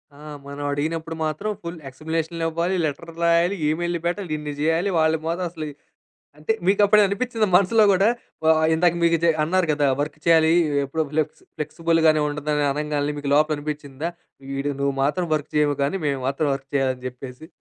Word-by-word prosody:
ఆ! - - -16 0.3
మనం 140 +1 -6
అడిగినప్పుడు 160 +3 -3
మాత్రం 155 +8 -3
ఫుల్ 170 0 -6
ఎక్స్‌లపేషన్ 160 +4 -3
ఇవ్వాలి, 170 +3 -1
లెటర్‌ 160 +3 -5
రాయాలి, 170 +3 +3
ఈమెయిల్‌లు 175 +2 -1
పెట్టాలి 175 -1 -2
ఇన్ని 150 -1 -5
చేయాలి. 165 +5 +1
వాళ్ళు 160 0 +3
మాత్రం 175 +2 -1
అసలు 160 -2 -6 0.7
అంటే 155 +9 0 0.2
మికప్పుడు 205 +1 +5
అనిపిచ్చిందా 220 +2 -1
మనసులో 200 +4 +5
కూడా 195 +3 +3 0.4
వా 160 - +5 0.2
ఇందాక 170 +1 +3
మీకు 170 0 +4
జ - - +4 0.2
అన్నారు 175 +3 +1
కదా! 145 -1 +2
వర్క్ 150 +1 -3
చేయాలి. 160 -1 +5 0.3
ఎప్పుడో 160 +4 -2
ఫ్లెక్స్ 155 -1 -1 0.2
ఫ్లెక్స్‌బుల్ 165 +2 0
గానే 155 -1 +4
ఉంటుందని 150 0 -1
అనంగాల్నే 150 0 -2
మీకు 145 -1 -3
లోపల 155 +1 +3
అనిపిచ్చిందా 150 +1 -5 0.4
వీడు 140 +1 -2
నువ్వు 140 -1 0
మాత్రం 175 +6 0
వర్క్ 150 -2 -3
చేయవు 145 -1 +2
గానీ 145 +8 0
మేము 140 -2 -1
మాత్రం 140 +2 0
వర్క్ 135 0 -9
చేయాలని 130 -2 0
చెప్పేసి. 125 +3 -10
160 Hz, 165 wpm, -23 LUFS, 145-170 Hz, 0.7 s, మికప్పుడు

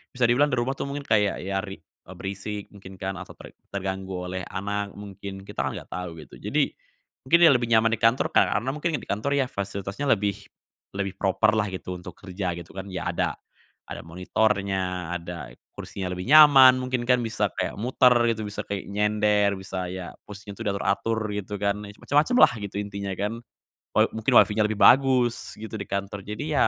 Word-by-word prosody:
bisa 125 - -1
dibilang 125 +5 +4
di 125 - -1
rumah 130 +3 -2
tuh - - -2
mungkin 140 +1 -5
kayak 105 -7 +1
ya 95 0 -1
rik 95 -1 -8 0.2
eee, - - -10
berisik 100 +1 -5
mungkin 95 -1 -12
kan, 95 -1 -5
atau 90 - -10
ter - - -12 0.2
terganggu 95 -2 -4
oleh 95 -1 -4
anak 100 +1 -4
mungkin. 100 -1 -8
Kita - - -9
kan - - -4
nggak - - -10
tahu 90 -2 -5
gitu. - - -15
Jadi, - - 0 0.6
mungkin 170 - +6
dia 165 - +9
lebih 120 -3 +2
nyaman 115 -1 +4
di 115 - -1
kantor 115 +3 +2
karena 120 +7 +2
mungkin 155 +2 -2
di - - -5
kantor 125 +8 -1
ya 140 - +3
fasilitasnya 100 +6 -4
lebih 105 -4 +1 0.6
lebih 100 -1 -3
proper-lah 105 +2 +2
gitu 90 -1 -6
untuk - - -10
kerja 95 -2 -4
gitu 85 -1 -10
kan, 95 +1 -7
ya 90 -2 -3
ada - - -1 0.6
ada - - -6
monitornya, 90 -1 -1
ada 85 -7 -8 0.2
kursinya 95 -2 -6
lebih 90 0 -5
nyaman 135 -4 +9
mungkin 125 -1 -2
kan- 125 0 +3
bisa 110 - -1
kayak - - -2
muter 125 +3 +3 0.2
gitu, 110 -1 -4
bisa 105 - -5
kayak 100 -2 -5
nyender, 105 0 +2
bisa 95 -1 -5
ya 90 -2 -7
posisinya 105 0 -10
tuh 115 - -7
diatur-atur 100 +3 0 0.2
gitu 105 0 -4
kan. 100 0 +1
Ya - - -9
macem-macemlah 150 - +4
gitu 100 -1 -5
intinya 100 -1 -4
kan. 110 +3 -2 0.5
Wa - - +5
mungkin 110 -1 -1
WiFi-nya 105 +1 +5
lebih 110 -1 -4
bagus 130 -2 +4
gitu 110 +1 -8
di 100 - -6
kantor 100 0 -4
jadi 105 +6 -5
ya, 145 - +4
100 Hz, 190 wpm, -25 LUFS, 95-115 Hz, 0.6 s, dia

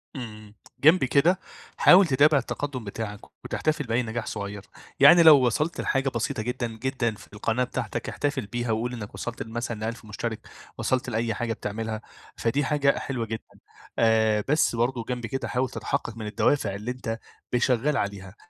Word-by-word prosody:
آمم 110 -4 -8 0.3
جنب 160 +3 +6
كده، 155 +8 +3 0.4
حاول 185 +1 +7
تتابع 145 +1 +5
التقدّم 135 -1 -3
بتاعك 105 0 -5 0.3
وتحتفل 155 -1 -1
بأي 120 +2 0
نجاح 115 0 -4
صغيّر، 100 -1 -5 0.4
يعني 165 +5 +8
لو 145 -5 +8
وصلت 150 +8 0
لحاجة 135 0 +1
بسيطة 115 -2 -2
جدًا، 125 +1 -2
جدًا 115 0 -2
في - - -15
القناة 115 +4 0
بتاعتك، 125 - -4
احتفل 145 -5 -2
بيها 120 0 -2
وقل 120 +3 -1
إنّك 110 -4 -7
وصلت 120 -1 -5
لمثلًا 115 0 -4
ل1000 115 +1 -5
مشترك، 110 +1 -5 0.3
وصلت 130 -1 0
لأي 115 0 -1
حاجة 115 +1 -2
بتعملها، 110 +1 -4 0.4
فدي 135 +5 0
حاجة 140 0 +2
حلوة 125 -4 -3
جدًا، 110 -1 -5 0.6
آآ 110 -2 +3
بس 150 -4 +2
برضو 120 +1 0
جنب 125 0 -4
كده 135 +4 -3
حاول 130 0 0
تتحقق 115 - -3
من 110 - -5
الدوافع 105 0 +1
اللي 105 +5 -4
أنت 115 -3 -4 0.3
ب - - +4
شغال 130 +4 +1
عليها، 100 -1 -4
120 Hz, 165 wpm, -26 LUFS, 110-135 Hz, 0.6 s, يعني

